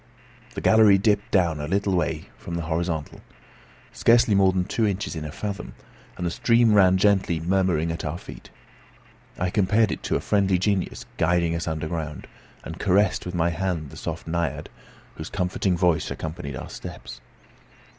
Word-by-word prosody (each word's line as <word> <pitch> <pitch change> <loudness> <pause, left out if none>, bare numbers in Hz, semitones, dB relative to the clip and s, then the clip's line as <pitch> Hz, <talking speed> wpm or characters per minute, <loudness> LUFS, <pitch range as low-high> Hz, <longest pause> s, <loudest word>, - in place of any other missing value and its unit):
The - - -4
gallery 110 -3 +6
dipped 100 +1 +1
down 85 -5 +2
a 75 - -4
very - - -8
little 100 0 +1
way 90 - -2
from 85 - -7
the 85 - -3
horizontal, 80 -2 -3 0.7
scarcely 115 -2 +4
more 95 -1 +4
than 90 -1 -1
two 110 +3 0
inches 100 -2 -3
in 80 - -4
a 75 - -6
fathom, 100 +1 -6 0.4
and 90 - -3
the 85 - -1
stream 115 +3 +3
ran 95 -2 +5
gently 95 -4 +2
murmuring 85 -2 +1
at 80 - -5
our 80 +1 -3
feet. - - -12 0.9
I 90 0 -1
compared 105 +2 +2
it - - -4
to - - -1
a - - +1
friendly 100 -2 +2
genius 95 0 -1
guiding 85 0 +2
us 85 +1 -3
underground, 80 -1 -4 0.4
and 80 +2 -8
caressed 100 -1 +2
with 90 - -5
my 85 0 +1
hand 85 -3 -3
the - - -11
soft - - -5
naiad, 80 -3 -2 0.5
whose - - -6
comforting 90 0 -1
voice 85 -3 +1
accompanied 80 -4 -5
our - - -7
steps. - - -9
90 Hz, 175 wpm, -24 LUFS, 80-100 Hz, 0.9 s, gallery